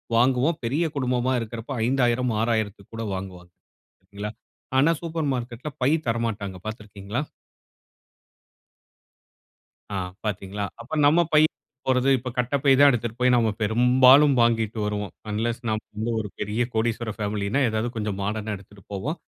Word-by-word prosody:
வாங்குவோம். 130 +6 +3
பெரிய 145 +8 +1
குடும்பமா 125 -1 0
இருக்குறப 115 +3 -5
ரூ.5000 125 -1 +2
ரூ.6000 110 -2 +1
த்திற்கு 100 -1 -21
கூட 115 0 -4
வாங்குவாங்க. 90 -2 -8 1.3
ஆனா, 145 +5 +5
சூப்பர் 165 -3 -2
மார்க்கெட்‌ல 120 +3 -5
பை 130 - +4 0.2
தரமாட்டாங்க 110 -5 -2
பாத்து 110 +1 -5
இருக்குறீர்களா? 105 +5 -5 2.7
ஆ - - -1 0.3
பாத்தீங்களா, 100 -1 -3 0.2
அப்ப 130 +7 -11
நம்ப 160 +4 +5
பை 150 - +7 0.5
போறது 130 +1 +3
இப்ப 125 +1 -5
கட்டப்பை 135 +3 +2
தான் 145 0 +8
எடுத்துகிட்டு 120 -1 -3
போய் 125 0 +5
நம்ப 115 -2 +3
பெரும்பாலும் 130 +6 +6
வாங்கிட்டு 115 -1 +2
வருவோம். 105 -1 -3 0.2
அன்லெஸ் 115 +3 -1
நம்ப 110 0 -1
வந்து 110 +2 -2
ஒரு 105 -2 -4
பெரிய 105 +3 -1
கோடீஸ்வரர் 110 -1 -1
ஃபேமிலினா, 105 +4 -1
ஏதாவது 110 +2 -1
கொஞ்சம் 105 -3 -2
மாடர்னா 105 +1 -2
எடுத்துட்டு 100 0 -17
போவோம். 140 - -3
115 Hz, 135 wpm, -25 LUFS, 105-125 Hz, 2.7 s, தான்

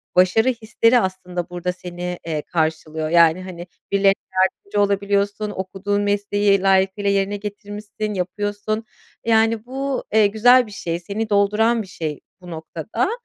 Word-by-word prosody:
başarı 185 +7 +4
hisleri 230 +1 +2
aslında 180 -3 -3
burada 180 0 -3
seni, 180 0 -6
eee, 155 -2 -1
karşılıyor, 155 -1 -2
yani, 170 +1 +5
hani, 180 -1 -8 0.2
birilerine 200 0 +4 0.2
yardımcı 195 +2 +1
olabiliyorsun, 200 +1 0
okuduğun 195 +2 -2
mesleği 205 -1 +1
layıkıyla 195 +1 +2
yerine 200 +1 +1
getirmişsin, 210 +1 -6
yapıyorsun. 205 +3 -3 0.4
Yani, 225 0 +2
bu, 270 +1 -3
eee, 215 -1 +6
güzel 245 +4 +5
bir 210 - -12
şey, 170 -3 -4
seni 205 +5 -4
dolduran 210 +3 +2
bir 200 - -9
şey 155 -5 -5 0.2
bu 180 -1 -10
noktada, 160 - -3
200 Hz, 135 wpm, -21 LUFS, 180-215 Hz, 0.4 s, eee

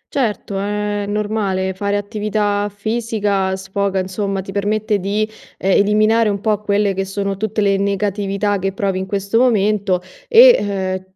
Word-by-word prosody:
Certo 210 -6 -1
è 205 0 -2
normale, 205 -3 -1
fare 200 +2 -1
attività 205 0 -1
fisica 205 -2 -1
sfoga, 195 0 -2
insomma, 195 +1 -2
ti 195 - -8
permette 205 +1 0
di, 205 +3 -1 0.3
ehm, 195 - 0
eliminare 215 +2 +3
un 200 -1 -1
po' 210 0 0
quelle 205 -1 +1
che 195 +1 -2
sono 195 0 -3
tutte 215 +2 -2
le 200 -1 +2
negatività 200 0 -1
che 195 +1 -2
provi 195 -1 -1
in 190 - -4
questo 200 +3 0
momento 210 -6 +2 0.2
e, 200 - +4
205 Hz, 145 wpm, -18 LUFS, 195-210 Hz, 0.3 s, e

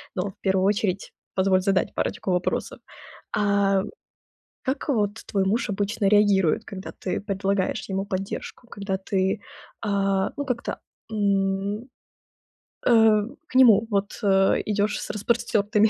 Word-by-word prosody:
Но 195 +2 -1
в - - -28
1 190 -1 +2
очередь 200 -2 0 0.2
позволь 190 -1 +3
задать 195 -1 +1
парочку 190 - -2
вопросов. 180 0 -1 0.6
А 200 -2 +2 0.8
как 270 +4 -2
вот 210 -6 +1
твой 195 -2 0
муж 220 +2 0
обычно 200 0 -1
реагирует, 205 -2 +3
когда 195 -2 -7
ты 185 - -2
предлагаешь 195 +1 -1
ему 195 0 -1
поддержку, 195 +5 -5
когда 195 -3 -3
ты, 190 0 0 0.4
а, 195 -2 0
ну, 285 - -2
как-то, 250 -3 -3 0.3
м, 200 +2 0 1.0
э, 220 -3 +5 0.3
к - - -15
нему, 225 -4 +6
вот, 200 0 0
э, 195 -1 +4
идёшь 205 0 0
с - - -6
распростёртыми, 215 -1 +2
200 Hz, 130 wpm, -25 LUFS, 195-215 Hz, 1.0 s, нему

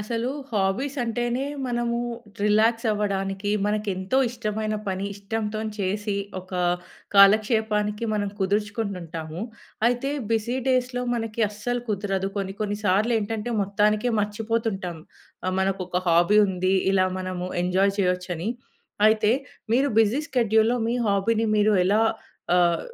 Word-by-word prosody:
అసలు 230 +3 -2 0.2
హాబీస్ 215 +7 0
అంటేనే, 240 +3 -1 0.2
మనము 240 -1 -1 0.5
రిలాక్స్ 220 +3 +3
అవ్వడానికి, 200 -1 -1 0.2
మనకు 210 0 -1
ఎంతో 190 +8 0
ఇష్టమైన 215 -2 -3
పని 190 +1 -2
ఇష్టంతో 210 +1 -3 0.2
చేసి, 205 +2 -1 0.3
ఒక 185 +1 -17 0.6
కాలక్షేపానికి 210 +1 +4
మనం 205 -1 0
కుదుర్చుకుంటు 205 +1 -1
ఉంటాము. 160 0 -6 0.5
అయితే, 245 +3 +1 0.2
బిజీ 225 +3 0
డేస్‌లో 250 -1 +1
మనకి 225 -1 -2
అస్సలు 240 +4 -3
కుదరదు. 195 -2 -1
కొన్ని 195 -1 -3
కొన్ని 205 -1 -1
సార్లు 205 +5 +3
ఏంటంటే, 220 +2 -3
మొత్తానికే 210 +4 +1
మర్చిపోతుంటాం. 210 -4 -2 0.5
ఆహ్, 185 0 0
మనకు 195 0 0
ఒక 180 0 -1
హాబీ 175 +5 +5
ఉంది, 185 0 0 0.2
ఇలా 185 -1 +3
మనము 185 -1 -4
ఎంజాయ్ 190 +2 +2
చేయొచ్చని. 180 0 -1 0.6
అయితే, 215 0 +3 0.4
మీరు 275 +3 +3
బిజీ 225 +6 +2
షెడ్యూల్‍లో, 225 -1 +3
మీ 240 - 0
హాబీని 215 +3 +1
మీరు 210 0 +4
ఎలా 205 +3 +3 0.6
ఆహ్, 175 -1 +3
210 Hz, 125 wpm, -25 LUFS, 195-225 Hz, 0.6 s, హాబీ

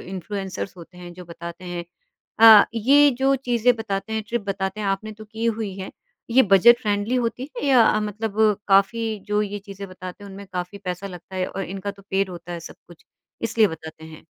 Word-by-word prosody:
Influencers 195 0 -5
होते 180 +1 -13
हैं, 175 -1 -9
जो 180 0 -11
बताते 170 +1 -9
हैं 175 -1 -5 0.6
अ, 220 -2 +10
ये 280 +6 +5
जो 270 +1 +3
चीज़ें 245 -2 +2
बताते 205 -1 -4
हैं, 220 0 -1
ट्रिप 240 -1 -2
बताते 190 +1 -2
हैं, 205 - -2
आपने 195 +3 -2
तो 215 +1 -12
की 220 +2 -6
हुई 215 -4 -2
है, 190 - -6 0.4
ये 260 +3 +6
बजट 235 +5 +7
फ्रेंडली 205 +1 -1
होती 245 +3 -2
है - - -4
या 240 -5 +5
मतलब 210 0 -4 0.3
काफ़ी 215 +3 +2
जो 210 0 +1
ये 205 0 -4
चीज़ें 200 0 -9
बताते 185 +2 -9
हैं 200 - -10
उनमें 200 +1 -10
काफ़ी 180 +2 -5
पैसा 180 +2 -4
लगता 185 0 -10
है 185 - 0
और 195 - -5
इनका 195 +2 -5
तो 200 0 -15
पेड 195 0 0
होता 175 0 -8
है 170 - -5
सब - - -10
कुछ 175 -2 -17 0.4
इसलिए 230 -1 +3
बताते 160 -1 -9
हैं? 160 -1 -12
200 Hz, 205 wpm, -23 LUFS, 185-225 Hz, 0.6 s, अ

